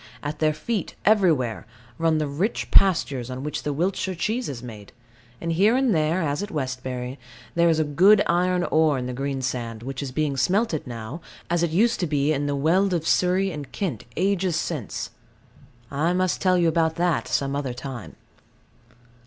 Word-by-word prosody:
At 150 Hz, +1 st, -4 dB
their 155 Hz, -1 st, +3 dB
feet, 185 Hz, +6 st, -3 dB
everywhere, 160 Hz, -, +2 dB, 0.3 s
run 165 Hz, -1 st, +2 dB
the 155 Hz, -, 0 dB
rich 160 Hz, +11 st, -2 dB
pastures 145 Hz, -10 st, +3 dB
on 130 Hz, +1 st, -5 dB
which 150 Hz, -, -3 dB
the 150 Hz, -, -2 dB
Wiltshire 185 Hz, +4 st, -1 dB
cheese 220 Hz, +8 st, -1 dB
is 125 Hz, -3 st, -6 dB
made; 105 Hz, -4 st, -10 dB, 0.5 s
and 170 Hz, -, -2 dB
here 200 Hz, +8 st, +4 dB
and 260 Hz, -4 st, +2 dB
there, 160 Hz, +2 st, +1 dB
as 145 Hz, -1 st, -1 dB
at 205 Hz, -, -4 dB
Westbury, 130 Hz, -2 st, -4 dB, 0.3 s
there 170 Hz, 0 st, +4 dB
is 160 Hz, -1 st, +2 dB
good 185 Hz, +8 st, +5 dB
iron 180 Hz, +1 st, +2 dB
ore 155 Hz, -3 st, +3 dB
in 125 Hz, -, -3 dB
the 125 Hz, -, -4 dB
greensand, 130 Hz, -4 st, -3 dB
which 135 Hz, +1 st, -5 dB
is 140 Hz, -2 st, -4 dB
being 145 Hz, 0 st, -1 dB
smelted 180 Hz, -, +1 dB
now, 120 Hz, +6 st, -6 dB, 0.3 s
as 175 Hz, -1 st, +2 dB
it 170 Hz, -, +2 dB
used 210 Hz, +9 st, +2 dB
to 175 Hz, -, 0 dB
be 145 Hz, 0 st, +1 dB
in 145 Hz, 0 st, -1 dB
the 145 Hz, -, 0 dB
Weald 180 Hz, +7 st, +2 dB
of 165 Hz, -1 st, -2 dB
Surrey 185 Hz, +2 st, +2 dB
and 150 Hz, -4 st, -7 dB
Kent 165 Hz, -, -3 dB
ages 190 Hz, -1 st, +1 dB
since. 155 Hz, -, -3 dB, 0.8 s
I 155 Hz, +5 st, +1 dB
must 185 Hz, -1 st, 0 dB
tell 185 Hz, -1 st, +3 dB
you 170 Hz, -1 st, +3 dB
about 160 Hz, 0 st, +2 dB
that 175 Hz, -2 st, 0 dB
some 140 Hz, 0 st, 0 dB
other 135 Hz, -4 st, -3 dB
time. 125 Hz, -3 st, -7 dB
155 Hz, 180 wpm, -24 LUFS, 135-180 Hz, 0.8 s, good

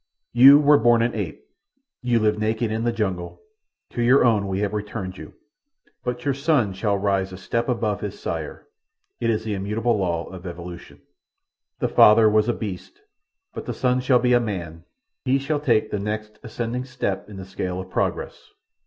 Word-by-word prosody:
"You 135 Hz, +4 st, +9 dB
were 150 Hz, 0 st, +5 dB
born 120 Hz, 0 st, +4 dB
an 120 Hz, -, 0 dB
ape. 100 Hz, -8 st, -5 dB, 0.6 s
You 125 Hz, -1 st, +1 dB
lived 110 Hz, -1 st, +1 dB
naked 110 Hz, +1 st, -1 dB
in 110 Hz, +1 st, -2 dB
the 120 Hz, -, +2 dB
jungles—to 115 Hz, -, -6 dB
your 125 Hz, +3 st, +5 dB
own 105 Hz, -4 st, +2 dB
we 95 Hz, +1 st, -2 dB
have 105 Hz, 0 st, -1 dB
returned 105 Hz, -3 st, -5 dB
you; 80 Hz, -, -11 dB, 0.7 s
but 125 Hz, +1 st, -4 dB
your 140 Hz, -, +2 dB
son 140 Hz, -, +1 dB
shall 100 Hz, +1 st, 0 dB
rise 95 Hz, -1 st, 0 dB
a 95 Hz, -, -8 dB
step 115 Hz, +6 st, -2 dB
above 110 Hz, -5 st, -1 dB
his -, -, -6 dB
sire. -, -, -5 dB, 0.5 s
It 115 Hz, -, 0 dB
is 110 Hz, -1 st, 0 dB
the 110 Hz, -1 st, -3 dB
immutable 105 Hz, +4 st, -1 dB
law 85 Hz, -3 st, -1 dB
of 95 Hz, -1 st, -9 dB
evolution. 85 Hz, 0 st, -9 dB, 0.8 s
"The -, -, +2 dB
father 110 Hz, +1 st, +6 dB
was 110 Hz, +1 st, +3 dB
a -, -, +2 dB
beast, 105 Hz, -, -7 dB, 0.5 s
but -, -, -7 dB
the -, -, -3 dB
son 125 Hz, 0 st, +1 dB
shall 125 Hz, 0 st, +4 dB
be 125 Hz, 0 st, +2 dB
a 120 Hz, -, +5 dB
man—he 110 Hz, -, -4 dB
shall 145 Hz, +2 st, -2 dB
take 115 Hz, -7 st, +1 dB
the 105 Hz, -, -1 dB
next 105 Hz, +1 st, -5 dB
ascending 120 Hz, +1 st, -4 dB
step 125 Hz, -6 st, -4 dB
in 100 Hz, -, -10 dB
the 95 Hz, -, -7 dB
scale 90 Hz, -1 st, -4 dB
of 95 Hz, 0 st, -8 dB
progress. -, -, -3 dB
110 Hz, 180 wpm, -23 LUFS, 95-125 Hz, 0.8 s, You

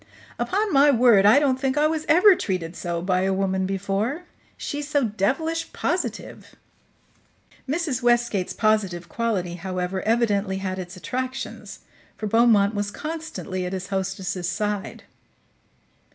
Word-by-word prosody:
Upon 410 Hz, 0 st, 0 dB
my 285 Hz, +1 st, +6 dB
word 235 Hz, -6 st, +5 dB
I 215 Hz, -, +7 dB
don't 275 Hz, -3 st, +2 dB
think 265 Hz, +1 st, -1 dB
I 300 Hz, -, +4 dB
was 310 Hz, 0 st, -1 dB
ever 365 Hz, +5 st, +7 dB
treated 180 Hz, -, -3 dB
so 170 Hz, -1 st, -3 dB
by 185 Hz, 0 st, +1 dB
a 190 Hz, +1 st, +1 dB
woman 190 Hz, -1 st, 0 dB
before. 200 Hz, -, -2 dB, 0.3 s
She's 290 Hz, 0 st, -4 dB
so 290 Hz, -2 st, +1 dB
devilish 265 Hz, -, -1 dB
positive." -, -, -3 dB, 1.1 s
Mrs. 295 Hz, -4 st, -1 dB
Westgate's 240 Hz, -6 st, +1 dB
positive 195 Hz, -6 st, 0 dB
quality, 210 Hz, -7 st, -2 dB
however, 185 Hz, +1 st, -3 dB
evidently 210 Hz, -4 st, +1 dB
had 190 Hz, -1 st, -4 dB
its 180 Hz, +1 st, -7 dB
attractions, 255 Hz, +6 st, -5 dB, 0.4 s
for 215 Hz, -, -5 dB
Beaumont 220 Hz, -2 st, +4 dB
was 205 Hz, -1 st, -2 dB
constantly 310 Hz, -, -5 dB
at 180 Hz, +1 st, -4 dB
his 190 Hz, 0 st, -5 dB
hostess's 190 Hz, -2 st, -2 dB
side. 205 Hz, +1 st, -3 dB
210 Hz, 135 wpm, -24 LUFS, 190-265 Hz, 1.1 s, I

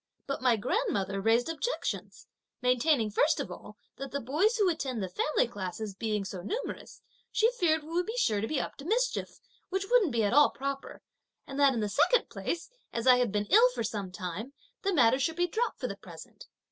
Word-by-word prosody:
But 275 Hz, -, -3 dB
my 250 Hz, -2 st, +4 dB
grandmother 195 Hz, -2 st, -1 dB
raised 225 Hz, +3 st, +3 dB
objections; 330 Hz, +10 st, -3 dB, 0.3 s
maintaining 250 Hz, -2 st, +2 dB
first 295 Hz, +8 st, +2 dB
of -, -, -4 dB
all, -, -, -10 dB, 0.2 s
that 275 Hz, 0 st, -6 dB
the 280 Hz, -, -3 dB
boys 320 Hz, -, +1 dB
who 410 Hz, -3 st, +3 dB
attend 265 Hz, -, -1 dB
the -, -, -2 dB
family 250 Hz, +7 st, +1 dB
classes 205 Hz, -1 st, -5 dB
being 210 Hz, 0 st, -2 dB
so 190 Hz, -2 st, -6 dB
numerous, 460 Hz, -, -5 dB, 0.3 s
she 450 Hz, +2 st, +3 dB
feared 325 Hz, -10 st, +1 dB
we 305 Hz, -, -12 dB
would 350 Hz, +2 st, -1 dB
be 450 Hz, +3 st, -4 dB
sure 215 Hz, -, +2 dB
to 220 Hz, -, -1 dB
be 300 Hz, +1 st, -1 dB
up -, -, -5 dB
to 275 Hz, -, -10 dB
mischief, -, -, -1 dB, 0.3 s
which 385 Hz, +1 st, -1 dB
wouldn't 455 Hz, -, +4 dB
be 230 Hz, -2 st, +1 dB
at 205 Hz, -, +1 dB
all 290 Hz, +1 st, +7 dB
proper; 275 Hz, 0 st, -5 dB, 0.4 s
and 275 Hz, 0 st, -6 dB
that, 280 Hz, -2 st, +5 dB
in 225 Hz, -, -1 dB
the 210 Hz, -, 0 dB
second 480 Hz, -, +2 dB
place, 340 Hz, -, -3 dB, 0.2 s
as 230 Hz, -, -3 dB
I 255 Hz, -1 st, +7 dB
had 245 Hz, -4 st, +1 dB
been 205 Hz, 0 st, 0 dB
ill 465 Hz, +4 st, +7 dB
for -, -, -1 dB
some 205 Hz, -4 st, -4 dB
time, 190 Hz, +7 st, -6 dB, 0.3 s
the 395 Hz, -, 0 dB
matter 260 Hz, -6 st, +4 dB
should 320 Hz, +5 st, 0 dB
be 350 Hz, +1 st, +2 dB
dropped, 450 Hz, +7 st, -2 dB
for -, -, -3 dB
the -, -, -6 dB
present. -, -, -12 dB
270 Hz, 210 wpm, -29 LUFS, 220-350 Hz, 0.4 s, all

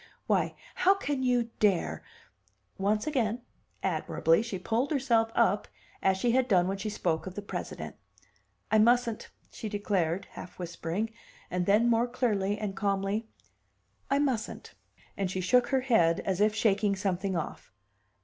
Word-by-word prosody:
Why, -, -, +1 dB, 0.2 s
how 385 Hz, +2 st, +4 dB
can 290 Hz, -8 st, -2 dB
you 245 Hz, -2 st, +1 dB
dare 200 Hz, -5 st, +1 dB, 0.4 s
" 100 Hz, 0 st, -40 dB
Once 210 Hz, 0 st, +1 dB
again, 245 Hz, -6 st, 0 dB, 0.4 s
admirably 165 Hz, +4 st, +2 dB
she 230 Hz, -4 st, -4 dB
pulled 225 Hz, +8 st, 0 dB
herself 235 Hz, -6 st, +2 dB
up 210 Hz, -3 st, +2 dB, 0.3 s
as 190 Hz, 0 st, +3 dB
she 235 Hz, +5 st, +1 dB
had 255 Hz, +1 st, +2 dB
done 180 Hz, -6 st, +4 dB
when 195 Hz, +1 st, -2 dB
she 215 Hz, +2 st, -3 dB
spoke 175 Hz, -5 st, -1 dB
of 185 Hz, -, -7 dB
the 205 Hz, -, -4 dB
President. -, -, -6 dB, 0.8 s
"I 220 Hz, -, +5 dB
mustn't!" 235 Hz, 0 st, +2 dB, 0.2 s
she 220 Hz, -, -6 dB
declared, 195 Hz, -4 st, -1 dB
half -, -, -10 dB
whispering, 175 Hz, +5 st, -3 dB, 0.4 s
and 180 Hz, -1 st, -1 dB
then 210 Hz, +4 st, +4 dB
more 235 Hz, +1 st, +3 dB
clearly 210 Hz, -5 st, 0 dB
and 205 Hz, -2 st, -4 dB
calmly, 200 Hz, +2 st, -1 dB, 0.8 s
"I 275 Hz, -, +3 dB
mustn't." 265 Hz, -6 st, -2 dB, 0.4 s
And 195 Hz, -2 st, -1 dB
she 185 Hz, -, -3 dB
shook 240 Hz, +7 st, +3 dB
her 265 Hz, -1 st, +1 dB
head 220 Hz, -11 st, +3 dB
as 190 Hz, 0 st, -1 dB
if 215 Hz, 0 st, +3 dB
shaking 205 Hz, -2 st, +2 dB
something 190 Hz, 0 st, -1 dB
off. 165 Hz, -, -5 dB
210 Hz, 155 wpm, -29 LUFS, 190-235 Hz, 0.8 s, I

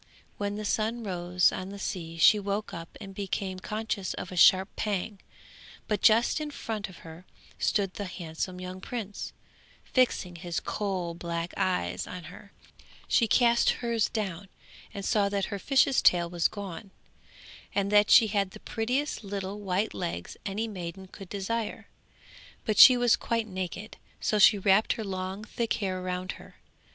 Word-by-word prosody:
When 205 Hz, 0 st, -2 dB
the 215 Hz, 0 st, -5 dB
sun 225 Hz, +3 st, -1 dB
rose 180 Hz, -2 st, +2 dB
on 185 Hz, -, -5 dB
the 200 Hz, -, -8 dB
sea 170 Hz, -4 st, -5 dB
she 210 Hz, +6 st, +6 dB
woke 205 Hz, +1 st, -3 dB
up 165 Hz, 0 st, -8 dB
and 195 Hz, -1 st, -9 dB
became 190 Hz, -1 st, -3 dB
conscious 210 Hz, -1 st, -3 dB
of 185 Hz, -, -6 dB
a -, -, -6 dB
sharp 190 Hz, +3 st, +5 dB
pang, 205 Hz, -1 st, -2 dB, 0.7 s
but 210 Hz, -2 st, -1 dB
just 230 Hz, +7 st, +4 dB
in 300 Hz, -, -3 dB
front 220 Hz, -8 st, -5 dB
of 185 Hz, -, -13 dB
her 165 Hz, +2 st, -10 dB, 0.4 s
stood 195 Hz, -3 st, +1 dB
the 205 Hz, -, -5 dB
handsome 180 Hz, 0 st, -5 dB
young 185 Hz, 0 st, -7 dB
prince, 210 Hz, -4 st, -5 dB, 0.5 s
fixing 200 Hz, -9 st, +1 dB
his 170 Hz, 0 st, -3 dB
coal 185 Hz, -5 st, -3 dB
black 170 Hz, 0 st, -4 dB
eyes 185 Hz, -, -1 dB
on 180 Hz, -1 st, -7 dB
her; 200 Hz, -, -14 dB, 0.6 s
she 230 Hz, -, +3 dB
cast 235 Hz, 0 st, +4 dB, 0.2 s
hers 230 Hz, -2 st, +1 dB
down 195 Hz, -4 st, -4 dB, 0.4 s
and 200 Hz, -2 st, -6 dB
saw 205 Hz, -2 st, +2 dB
that 200 Hz, -1 st, 0 dB
her 200 Hz, -, -3 dB
fish's 270 Hz, +4 st, +3 dB
tail 175 Hz, -1 st, +4 dB
was 170 Hz, -1 st, +1 dB
gone, 200 Hz, -1 st, -7 dB, 0.9 s
and 200 Hz, 0 st, +1 dB
that 210 Hz, 0 st, +5 dB
she 230 Hz, -, +8 dB
had 200 Hz, -2 st, 0 dB
the -, -, -11 dB
prettiest 250 Hz, +5 st, -2 dB
little 200 Hz, 0 st, -4 dB
white 195 Hz, +1 st, -1 dB
legs 85 Hz, +1 st, -4 dB
any 210 Hz, +4 st, -2 dB
maiden 190 Hz, -2 st, -7 dB
could 190 Hz, 0 st, -12 dB
desire; 210 Hz, +2 st, -3 dB, 0.8 s
but 215 Hz, -, 0 dB
she 255 Hz, -2 st, +11 dB
was 245 Hz, -1 st, +4 dB
quite 230 Hz, -1 st, -1 dB
naked, 190 Hz, +1 st, -6 dB, 0.2 s
so 210 Hz, -, +1 dB
she 205 Hz, +1 st, +7 dB
wrapped 195 Hz, +2 st, +3 dB
her 225 Hz, -, -5 dB
long 190 Hz, +1 st, -4 dB
thick 230 Hz, -1 st, -2 dB
hair 185 Hz, -3 st, -2 dB
around 185 Hz, +1 st, -3 dB
her. -, -, -13 dB
200 Hz, 165 wpm, -28 LUFS, 185-215 Hz, 0.9 s, she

